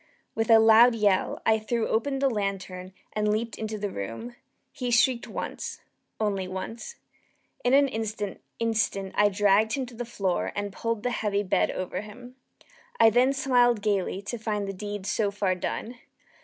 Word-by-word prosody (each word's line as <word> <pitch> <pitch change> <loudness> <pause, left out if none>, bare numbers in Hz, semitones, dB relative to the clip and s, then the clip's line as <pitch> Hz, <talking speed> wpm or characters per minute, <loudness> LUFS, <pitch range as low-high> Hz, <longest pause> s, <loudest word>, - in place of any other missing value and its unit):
With 225 0 -1
a 225 - +9
loud 225 +2 +7
yell, 205 -4 +1
I 220 0 +4
threw 225 +1 -1
open 270 +5 0
the 275 0 +2
lantern 195 -5 -3 0.2
and 210 0 0
leaped 225 +2 -2
into 220 0 -4
the 205 -1 -3
room. 115 - -6 0.4
He 250 -3 -4
shrieked 240 +1 +3
once - - -5 0.4
once 200 - -3
only. - - -38
In 245 +2 +4
an 280 0 +5
instant 220 -4 -4 0.7
I 205 0 +4
dragged 205 +2 +3
him 270 -2 -1
to 245 - -13
the 240 +1 -5
floor, 195 -6 -2
and 205 -1 -3
pulled 230 -1 -3
the 245 - 0
heavy 205 -3 0
bed 185 - +1
over 185 0 -4
him. 245 +4 -12 0.6
I 225 - +7
then 250 +4 +4
smiled 245 -5 +2
gaily, 200 -2 0
to 235 +3 -5
find 210 -2 -2
the 195 - -4
deed 205 0 -6
so 210 +1 0
far 200 -2 0
done. 230 +6 -5
215 Hz, 170 wpm, -27 LUFS, 200-235 Hz, 0.7 s, a